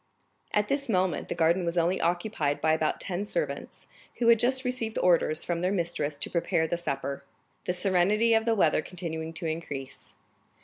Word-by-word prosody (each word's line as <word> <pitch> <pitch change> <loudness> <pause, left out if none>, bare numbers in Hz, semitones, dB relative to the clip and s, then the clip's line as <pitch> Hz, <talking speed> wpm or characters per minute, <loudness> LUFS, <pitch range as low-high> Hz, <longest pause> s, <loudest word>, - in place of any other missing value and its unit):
At 210 0 +1
this 275 0 -1
moment 185 -3 0
the - - -2
garden 170 +3 +2
was 170 +1 -2
only 175 +3 +2
occupied 170 -4 0
by 155 0 +2
about 160 -1 0
ten 185 +1 -2
servants, - - -3 0.3
who 235 -1 +2
had 230 -1 +6
just 260 +2 +2
received 245 -3 -2
orders 170 -3 +3
from 170 -1 -1
their 180 +1 +1
mistress 165 -6 -2
to - - -4
prepare 170 -1 +1
the 160 - -1
supper, 140 -4 -4 0.4
the 180 - 0
serenity 195 +5 +3
of 225 0 +3
the 230 -1 +2
weather 165 -6 +3
continuing 160 -2 -5
to 170 +1 -7
increase. 145 -5 -6
175 Hz, 180 wpm, -28 LUFS, 160-210 Hz, 0.4 s, had